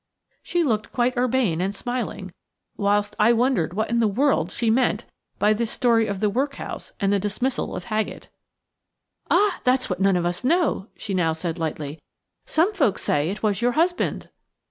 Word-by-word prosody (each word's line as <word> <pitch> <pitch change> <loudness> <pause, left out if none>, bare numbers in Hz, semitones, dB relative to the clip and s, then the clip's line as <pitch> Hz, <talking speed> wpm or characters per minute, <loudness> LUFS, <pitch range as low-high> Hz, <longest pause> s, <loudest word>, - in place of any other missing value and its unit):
She 350 -1 0
looked 220 -7 -1
quite 250 +1 +1
urbane 245 -9 +1
and 195 +2 -1
smiling, 235 -6 -4 0.4
whilst 205 0 +1
I 220 +3 +5
wondered 230 - +1
what 220 +2 -1
in 235 - +2
the 225 - +3
world 210 - +1
she 230 -2 0
meant 245 +2 +1 0.3
by 210 +1 +3
this 230 +1 -1
story 230 -3 +2
of 200 -1 -4
the 215 - +3
workhouse 275 +5 -3
and 200 -2 +2
the 200 - +2
dismissal 215 +6 -2
of - - -5
Haggett. 220 -2 -3 1.0
"Ah, 410 -3 +3
that's 255 -3 +2
what 180 - -2
none 195 -1 +4
of 175 -1 0
us 175 +4 -2
know!" 305 - +1
she 205 - -5
now 170 -3 +2
said 165 +1 -4
lightly; 155 -1 -4 0.5
"some 345 +7 +2
folks 275 - +1
say 145 +2 +1
it 205 +3 -5
was 205 -2 +1
your 245 +1 +2
husband." 350 +5 0
220 Hz, 180 wpm, -23 LUFS, 195-255 Hz, 1.0 s, I